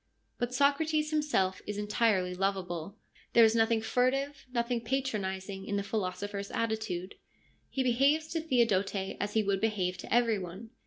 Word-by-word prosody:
But 245 0 -1
Socrates 300 +3 +2
himself 240 -12 +1
is 205 0 -3
entirely 210 -3 +1
lovable. 190 -1 -2 0.4
There 235 - +8
is 220 - +4
nothing 225 0 +3
furtive, 270 +4 0
nothing 235 -1 0
patronising 200 -7 -2
in 205 - -1
the 200 - 0
philosopher's 200 0 -3
attitude. 220 -5 -2 0.6
He 265 - -1
behaves 275 +6 +3
to 330 - -2
Theodote 230 -10 +2 0.2
as 205 +1 -2
he 220 - +3
would 195 -1 0
behave 190 -5 0
to - - -9
every 230 -3 +3
one. 190 +5 -8
220 Hz, 150 wpm, -30 LUFS, 195-255 Hz, 0.6 s, There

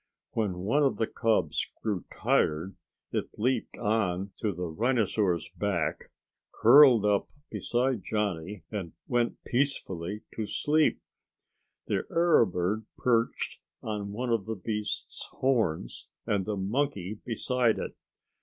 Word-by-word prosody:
When 105 -5 -1
one 115 +10 +2
of 140 -2 +2
the 110 - +1
cubs 115 0 +1 0.2
grew 100 -7 -1
tired 80 +5 +1 0.4
it - - -3
leaped 125 +5 0
on 100 -4 0
to 110 - 0
the 90 -1 -4
rhinosaur's 105 -2 +1
back, 85 -7 -1 0.5
curled 120 -2 +7
up 105 -1 +2 0.2
beside 125 -2 0
Johnny 100 -3 -2
and 95 -6 -4
went 120 -1 0
peacefully 105 -8 -1
to 110 -2 -3
sleep. 155 +6 +2 0.9
The - - -1
arrow 170 -8 +4
bird 95 +5 -1
perched 115 -2 0 0.2
on 105 -2 -3
one 120 +4 -2
of 110 -4 0
the 110 - -2
beast's 105 +1 -3
horns 110 - 0 0.2
and 100 -2 0
the 105 -1 -1
monkey 105 -1 -1
beside 120 0 +1
it. - - -5
105 Hz, 125 wpm, -29 LUFS, 95-120 Hz, 0.9 s, curled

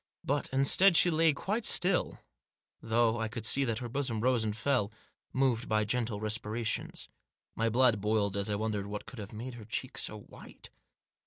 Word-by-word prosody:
But 145 +1 -1
instead 165 +7 +5
she 175 - +5
lay 160 0 +4
quite 205 +10 -2
still, 180 -2 +2 0.6
though 115 0 +2
I 110 - -1
could 110 0 -5
see 140 +5 +3
that 115 -3 -1
her 120 0 -4
bosom 125 -2 -2
rose 125 -1 +2
and 105 -1 -2
fell, 120 -4 +1 0.4
moved 125 -3 +1
by 110 -1 +2
gentle 115 -1 -1
respirations. 110 +1 -2 0.5
My 115 0 0
blood 120 -2 +3
boiled 105 -1 +1
as 100 +1 -1
I 105 - 0
wondered 105 -1 -2
what 105 0 -6
could 130 - -10
have 105 -1 -7
made 120 +4 -7
her 120 -2 -10
cheek 130 +4 -4
so 105 -1 -4
white. - - -10
115 Hz, 180 wpm, -31 LUFS, 110-130 Hz, 0.6 s, instead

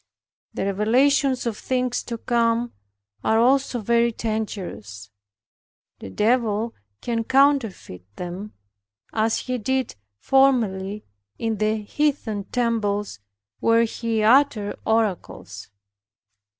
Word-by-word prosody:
The - - -2
revelations 255 +7 +2
of 230 -3 -1
things 255 -1 -1
to 235 - -4
come 235 0 0 0.5
are 220 - +2
also 260 +1 +3
very 235 +2 +2
dangerous. 180 - -5 0.9
The - - -8
Devil 225 - +1 0.3
can 230 -1 -1
counterfeit 260 - +1
them, 180 +4 -7 0.6
as 220 0 +1
he 255 -1 -3
did 260 +2 -1 0.2
formerly 215 - +1 0.3
in 225 -1 -2
the 215 0 0
heathen 225 -5 -1
temples, 210 - -1 0.4
where 230 0 +4
he 225 -1 -1
uttered 230 -3 +3
oracles. 180 - -2
225 Hz, 100 wpm, -23 LUFS, 205-245 Hz, 0.9 s, where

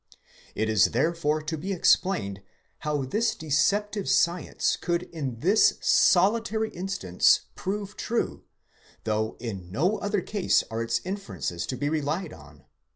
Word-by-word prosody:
It 110 - 0
is 110 -4 +4
therefore 155 +3 0
to 160 +1 -3
be 190 +6 -4
explained, 110 - +2 0.4
how 150 -2 -1
this 215 - 0
deceptive 200 +5 0
science 170 +6 +1
could 175 0 -1
in 140 -10 -6
this 200 +7 +4
solitary 220 +3 +3
instance 175 - +2
prove 200 +1 -4
true, 235 - -2 0.6
though 110 0 -1
in 95 -7 -6
no 180 - +1
other 205 -1 -1
case 205 +1 +1
are 115 +1 -2
its 115 0 -1
inferences 95 - -4
to 130 - -4
be 145 - -1
relied 155 +3 -2
on. - - -16
160 Hz, 135 wpm, -26 LUFS, 115-195 Hz, 0.6 s, is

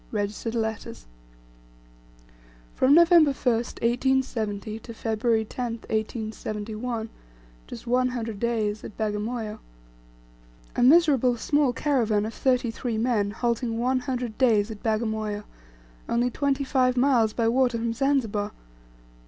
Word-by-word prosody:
"Registered 210 +2 -3
letters." 220 - -4 1.7
From 270 +3 +4
November 335 -3 +6
1st, 240 -3 -1
1870, 230 -4 0
to 230 +1 -10
February 220 0 0
10, 240 +1 -4 0.2
1871, 220 +1 -3 0.6
just 115 - -9
one 255 +1 +2
hundred 230 -4 -4
days, 215 -3 -1
at - - -9
Bagamoyo! 215 +1 -3 1.2
A - - 0
miserable 265 -3 +5
small 285 +2 +2
caravan 230 -6 +1
of 225 - -5
thirty 250 -3 +1
three 230 -1 -3
men 220 -3 +1
halting 235 +1 -1
one 255 +2 +1
hundred 250 -3 -4
days 225 -4 +3
at 215 - -9
Bagamoyo, 220 -2 -1 0.7
only 240 +1 +1
twenty 280 +2 0
five 255 -2 +1
miles 245 -4 +3
by 230 0 0
water 245 0 +2
from 230 0 -2
Zanzibar! 230 -6 0
230 Hz, 120 wpm, -25 LUFS, 220-255 Hz, 1.7 s, November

